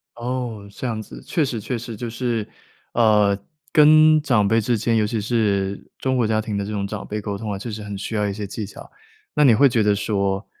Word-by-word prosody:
哦， 120 -4 -4
这 130 - -7
样 110 -3 -2
子。 - - -11
确 165 - +1
实 125 -5 -2
确 120 +4 -3
实 115 0 -7
就 115 +2 -5
是， 120 -2 -2 0.5
呃， 105 -3 +4 0.3
跟 155 0 +6
长 120 -8 +2
辈 115 +2 +3
之 120 +2 +1
间， 115 +2 0
尤 105 - +2
其 110 +1 -2
是 100 -3 -1
中 130 0 -1
国 120 -3 +2
家 110 0 +1
庭 110 -2 -4
的 100 - -1
这 105 - -5
种 100 -2 -2
长 100 0 -6
辈 105 - -3
沟 100 -1 -4
通 105 0 -5
啊， 100 - -3
确 110 +4 -6
实 105 - -6
很 100 -1 -6
需 110 - -5
要 105 -1 +1
一 100 - -2
些 105 +1 -5
技 105 +2 -5
巧。 100 - -12 0.5
那 - - +4
你 125 -6 +6
会 140 +6 +6
觉 120 -3 +1
得 105 -1 +3
说， 100 -1 -1
110 Hz, 260 characters per minute, -22 LUFS, 105-120 Hz, 0.5 s, 跟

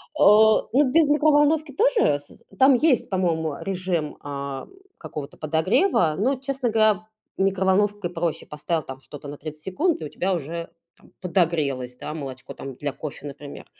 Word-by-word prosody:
Э, - - -3 0.5
ну 270 -1 +4
без 315 -1 +4
микроволновки 295 0 +3
тоже 445 - +3
с 145 - -17 0.2
там 265 +1 +7
есть, 265 -1 +2
по-моему, 165 -5 0
режим, 180 -5 -2
а, 140 -1 -5 0.3
какого-то 150 -1 -8
подогрева. 160 - +2
Но, 260 +7 +1
честно 270 -2 -2
говоря, 215 -1 +2 0.3
микроволновкой 195 0 +1
проще. 170 -2 -3
Поставил 155 +2 -2
там 135 0 -9
что-то 145 +1 -10
на 145 0 -7
30 155 0 -9
секунд, 315 - 0
и - - -4
у - - -6
тебя 190 +2 -1
уже 170 +1 -4 0.3
там - - -22
подогрелось, 155 -9 0
да, - - -6
молочко 135 -4 -7
там 135 -2 -8
для 145 +1 -3
кофе, 150 0 -8
например, 145 0 -9
175 Hz, 155 wpm, -24 LUFS, 150-250 Hz, 0.5 s, там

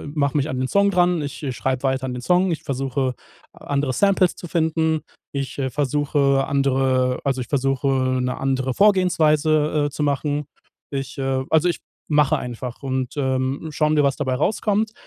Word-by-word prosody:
mache 140 0 +1
mich 145 +1 +1
an 130 - -3
den 130 - 0
Song 200 +4 +3
dran, 175 -2 +2
ich, 145 - -6
äh, 135 - -2
schreibe 130 +1 -2
weiter 130 0 0
an 125 - -3
dem 125 - -5
Song, 180 +6 +2
ich 160 - -3
versuche 135 -2 -2 0.4
andere 140 -2 -2
Samples 195 -1 +3
zu 175 - -9
finden, 160 -1 +1 0.3
ich, 140 0 -4
äh, 130 -1 0
versuche 140 0 +1
andere 130 -2 +1
also 135 -2 0
ich 120 - -6
versuche, 135 0 0 0.3
'ne 125 0 -2
andere 130 -1 -1
Vorgehensweise, 155 -6 +3
äh, - - -4
zu 150 - -3
machen. 145 +1 -1 0.5
Ich 135 +1 -4
äh 135 -1 -1
also 160 +2 +3
ich - - -2 0.3
mache 150 -2 +3
einfach 125 +2 -6
und, 130 0 -2
ähm, 130 +3 -1
schauen 155 +1 +1
wir, 150 - +4
was 140 -1 +1
dabei 130 -3 -1
herauskommt. 210 - 0
140 Hz, 180 wpm, -22 LUFS, 130-155 Hz, 0.5 s, wir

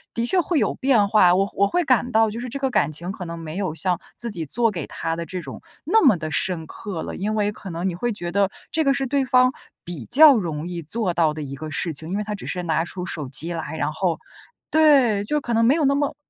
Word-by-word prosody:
的 230 - 0
确 360 +9 +3
会 340 0 -1
有 - - +1
变 245 -7 +2
化， 185 -4 +5
我 195 +1 +2
会 200 - -11
我 200 - +4
会 355 - 0
感 250 -3 +1
到 225 -1 +3
就 225 - -6
是 250 +1 -5
这 275 - -5
个 270 -1 -1
感 160 - +1
情 170 +5 -4
可 195 - -7
能 170 0 -6
没 165 +1 -7
有 185 -6 -2
像 180 0 -1 0.2
自 235 -1 +3
己 170 -5 -3
做 230 - +1
给 170 -7 -5
他 165 0 -3
的 170 0 -5
这 185 -1 -5
种 135 -5 -9 0.2
那 440 +8 +3
么 250 - +5
得 155 -1 -5
深 170 0 -1
刻 185 0 -6
了， - - -6
因 210 +3 -2
为 210 -1 +1
可 205 -1 -10
能 170 +2 -3
你 185 - -1
会 240 +7 -2
觉 175 -5 -5
得 200 +1 +2 0.2
这 320 - +1
个 275 - +3
是 275 -1 -1
对 275 +1 0
方 255 0 +3 0.3
比 170 -9 -8
较 295 +1 +7
容 165 -7 -3
易 175 -1 -5
做 180 +4 -1
到 165 -2 +2
的 155 - -5
一 140 -1 -6
个 155 +3 -7
事 160 +2 -2
情。 155 +3 -6
因 190 - -2
为 210 - -2
他 210 0 -5
只 205 - -7
是 180 - -3
拿 165 -1 0
出 180 +1 -6
手 150 -7 -5
机 160 +6 0
来， 160 -1 -5
然 - - -1
后 170 0 -1 0.5
对， 275 -10 +4
就 300 +8 -1
可 240 -4 -4
能 230 0 +3
没 260 +5 +4
有 320 -3 +1
那 275 +1 +3
么 285 0 -1
195 Hz, 300 characters per minute, -22 LUFS, 165-245 Hz, 0.5 s, 较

